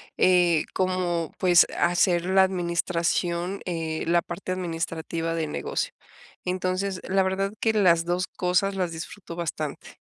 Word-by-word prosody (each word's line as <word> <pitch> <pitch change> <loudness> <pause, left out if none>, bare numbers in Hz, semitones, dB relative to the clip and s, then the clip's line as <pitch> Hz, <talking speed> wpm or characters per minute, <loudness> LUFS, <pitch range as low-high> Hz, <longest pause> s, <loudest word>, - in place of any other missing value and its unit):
eh, 175 -3 +4
como, 180 -3 -1
pues, 180 -2 +5
hacer 175 0 +3
la 190 0 +5
administración, 175 0 -1
eh, 165 -3 -3
la 170 0 +4
parte 185 +2 -5
administrativa 165 -1 -3
del 155 -2 -2
negocio. - - -2 0.5
Entonces, 185 +1 -1
la 190 0 +3
verdad 195 +1 -1
que 220 -1 +2
las 170 -5 +4
2 180 +1 0
cosas 185 +2 0
las 180 -3 -1
disfruto 170 +1 -8
bastante. 155 -3 -5
175 Hz, 130 wpm, -25 LUFS, 170-185 Hz, 0.5 s, pues